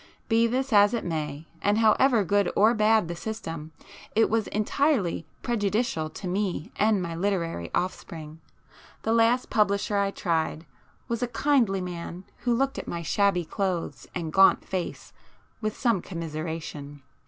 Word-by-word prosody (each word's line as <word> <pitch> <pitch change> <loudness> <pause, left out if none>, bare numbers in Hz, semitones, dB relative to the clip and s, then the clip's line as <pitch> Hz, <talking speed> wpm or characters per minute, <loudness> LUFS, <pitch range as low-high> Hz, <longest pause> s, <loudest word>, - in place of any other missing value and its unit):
Be 230 0 +4
this 260 +2 -1
as 205 +2 +6
it 230 - -3
may, 155 -2 -3 0.2
and 205 +1 +2
however 225 +1 +4
good 200 +1 +2
or 220 +3 +5
bad 215 -3 +3
the 170 - -4
system, 165 -6 -6 0.4
it 225 -1 +4
was 225 -2 +1
entirely 215 - 0 0.2
prejudicial 210 -7 0
to 185 - -7
me 190 0 -2
and 210 -2 +2
my 170 -1 -4
literary 170 - -1
offspring. 160 -3 -4 0.6
The 225 - +1
last 230 +2 +3
publisher 205 -1 +2
I 200 0 +2
tried 165 -4 -1 0.4
was 235 -1 -2
a 245 - +1
kindly 235 -5 +2
man 175 0 -6
who 240 -1 0
looked 270 +2 0
at - - -7
my 170 0 -4
shabby 185 0 +2
clothes 170 - -3
and 165 -3 -3
gaunt 195 0 +5
face 185 -2 -4 0.5
with 215 -1 -2
some 230 -7 +2
commiseration. 155 -4 -6
200 Hz, 150 wpm, -26 LUFS, 165-225 Hz, 0.6 s, as